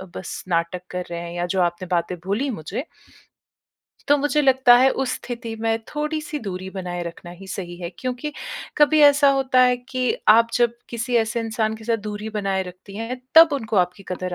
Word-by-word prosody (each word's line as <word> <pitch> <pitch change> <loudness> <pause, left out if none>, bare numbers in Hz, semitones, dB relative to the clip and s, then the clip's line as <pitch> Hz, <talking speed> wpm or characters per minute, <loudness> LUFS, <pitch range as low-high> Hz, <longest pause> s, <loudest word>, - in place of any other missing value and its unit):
बस 180 - -6
नाटक 170 +1 0
कर 180 0 -3
रहे 170 - -3
हैं 170 0 -7
या 175 0 -1
जो 190 - +1
आपने 175 +1 -1
बातें 175 0 0
बोली 215 +9 -1
मुझे। 205 - -5 1.2
तो 290 - +6
मुझे 290 +1 +1
लगता 260 -2 +6
है 260 +2 +5
उस 265 -1 -1
स्थिति 235 -2 -6
में 225 0 +1
थोड़ी-सी 300 0 -3
दूरी 185 0 -5
बनाए 180 -2 -5
रखना 170 0 -8
ही 180 +2 -12
सही 175 -2 -6
है 170 -1 -5
क्योंकि 255 +4 -4 0.4
कभी 300 +1 +5
ऐसा 285 0 +6
होता 265 -2 +2
है 250 0 +4
कि 255 -1 -3 0.3
आप 230 +2 +7
जब 240 -1 +2 0.2
किसी 240 +1 -3
ऐसे 230 +1 +1
इंसान 220 -1 -1
के 220 - -13
साथ 230 0 +1
दूरी 210 +1 -5
बनाए 195 -2 0
रखती 185 +2 -11
हैं 235 +3 -5
तब 325 -1 +9
उनको 225 -6 -2
आपकी 180 +2 +1
कदर 185 0 -4
220 Hz, 190 wpm, -22 LUFS, 180-255 Hz, 1.2 s, तब